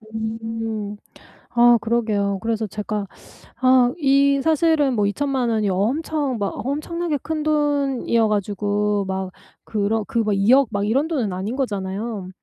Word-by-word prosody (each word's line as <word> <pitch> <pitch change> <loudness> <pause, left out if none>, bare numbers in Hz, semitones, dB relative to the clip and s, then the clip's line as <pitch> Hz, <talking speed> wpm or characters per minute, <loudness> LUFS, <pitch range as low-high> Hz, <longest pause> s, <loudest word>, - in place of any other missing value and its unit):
음. 220 -1 -4 0.6
아 240 0 +6
그러게요. 215 -3 0
그래서 225 -1 -1
제가 210 0 -4 0.5
아 255 -1 +4
이 280 -1 +3
사실은 315 -3 +2
뭐 210 -3 +1
20,000,000 265 +3 -1
원이 215 -2 +1
엄청 265 - -1
막 200 -1 -2
엄청나게 310 +3 -2
큰 315 -1 -3
돈이어 285 -6 +1
가지고 205 0 0
막 190 0 -3 0.3
그런 215 +1 -1
그 235 -4 0
200,000,000 240 +7 +4 0.2
이런 270 +9 +1
돈은 255 - -1
아닌 195 +7 -4
거잖아요. 205 -4 -3
225 Hz, 225 characters per minute, -22 LUFS, 205-275 Hz, 0.6 s, 아